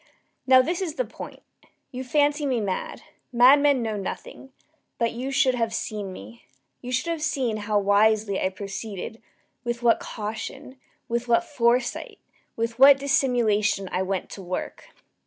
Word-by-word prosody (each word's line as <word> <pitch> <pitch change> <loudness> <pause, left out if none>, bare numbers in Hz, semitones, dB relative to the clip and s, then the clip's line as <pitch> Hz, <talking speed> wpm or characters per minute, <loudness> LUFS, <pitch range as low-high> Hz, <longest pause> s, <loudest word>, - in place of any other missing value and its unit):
Now 260 0 +7
this 340 +6 -2
is 330 -5 -3
the - - -1
point. - - -10 0.5
You 255 -1 -5
fancy 290 +2 +1
me 255 -3 +1
mad. 195 -3 -4 0.3
Madmen 265 +2 +5
know 220 -2 -2
nothing. 205 +6 -7 0.5
But 230 -1 0
you 250 +3 -5
should 270 -1 +3
have 230 -2 -1
seen 210 -4 -4
me. 110 - -12 0.3
You 250 - -6
should 260 +7 0
have 330 -2 -3
seen 265 -8 -1
how 210 0 -1
wisely 205 0 +2
I 185 - +1
proceeded 200 +2 -7 0.4
with 240 0 -3
what 235 -1 +4
caution 255 +5 -7 0.3
with 235 0 -2
what 235 -1 +3
foresight 240 -2 0 0.4
with 230 +1 -3
what 275 +1 +9
dissimulation 240 - +1
I 185 - 0
went 190 0 -3
to 195 - -8
work! 185 - -5
235 Hz, 155 wpm, -25 LUFS, 210-270 Hz, 0.5 s, what